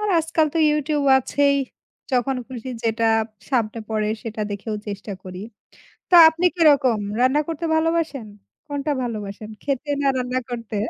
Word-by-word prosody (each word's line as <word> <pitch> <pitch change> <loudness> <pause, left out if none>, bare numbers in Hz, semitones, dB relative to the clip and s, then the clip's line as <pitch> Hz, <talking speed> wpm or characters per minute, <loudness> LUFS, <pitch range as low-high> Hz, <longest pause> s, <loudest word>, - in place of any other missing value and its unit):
আর 420 - -1
আজকাল 320 0 +1
তো - - +1
ইউটিউব 300 -1 0
আছেই। 280 +2 +1 0.6
যখন 255 +1 +1
খুশি 255 0 -7
যেটা 225 0 +1 0.4
সামনে 230 -4 0
পড়ে 215 -1 -1
সেটা 220 -1 -6
দেখেও 205 +2 -4
চেষ্টা 200 0 -6
করি। 185 0 -8 0.7
তো 355 - +5
আপনি 335 +3 -2
কিরকম 285 -8 +4 0.2
রান্না 260 +4 +3
করতে 330 0 -4
ভালোবাসেন? 320 -6 0 0.4
কোনটা 285 +1 -2
ভালোবাসেন? 215 -2 -6
খেতে 280 +1 -3
না 280 - +1
রান্না 250 0 -1
করতে? 230 -3 -6
260 Hz, 145 wpm, -22 LUFS, 225-300 Hz, 0.7 s, তো